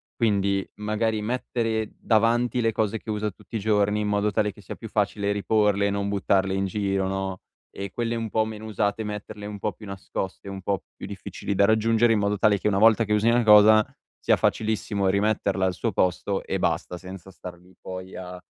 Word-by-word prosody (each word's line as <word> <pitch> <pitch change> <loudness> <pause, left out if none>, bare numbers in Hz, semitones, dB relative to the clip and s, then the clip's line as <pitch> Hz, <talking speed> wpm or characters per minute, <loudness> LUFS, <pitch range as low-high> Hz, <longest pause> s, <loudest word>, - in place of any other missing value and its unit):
Quindi 100 -4 +1
magari 105 +1 -1
mettere 115 -1 -2
davanti 120 +2 +2
le 115 -1 +1
cose 110 0 -1
che 110 - -12
usa 105 -1 -1
tutti 105 +4 -13
i 110 - 0
giorni, 105 0 +1
in 105 - -1
modo 105 0 +1
tale 105 +1 +1
che 100 - -16
sia 95 - -8
più 115 - -9
facile 100 -1 0
riporle, 100 -1 +2
non 100 0 -1
buttarle 95 -1 +1
in 95 0 0
giro, 95 -1 -1
no, 95 -1 -3 0.3
e 100 0 -5
quelle 115 +2 -2
un 115 -1 -3
po' 110 +1 +2
meno 110 0 -7
usate 105 0 -1
metterle 105 0 -6
un 105 0 -6
po' 105 - -1
più 105 +3 -13
nascoste, 100 0 -6
un 95 0 -6
po' 95 0 -2
più - - -9
difficili 100 - -5
da 100 - +4
raggiungere, 115 +2 +3
in 110 - +3
modo 100 0 0
tale 100 0 +3
che - - -1
una 95 - +2
volta 115 +1 +5
che 105 - 0
usi 105 +2 +3
una 120 +1 +3
cosa, 110 0 +8 0.4
sia - - +4
facilissimo 110 -2 0
rimetterla 100 0 +1
al 95 - +1
suo - - -2
posto 95 +2 0
e - - -3
basta, 90 - -1
senza 95 +1 -10
star 90 -1 -10
lì 90 +2 -21
poi 95 0 -8
a, 90 0 -7
105 Hz, 205 wpm, -25 LUFS, 100-110 Hz, 0.4 s, cosa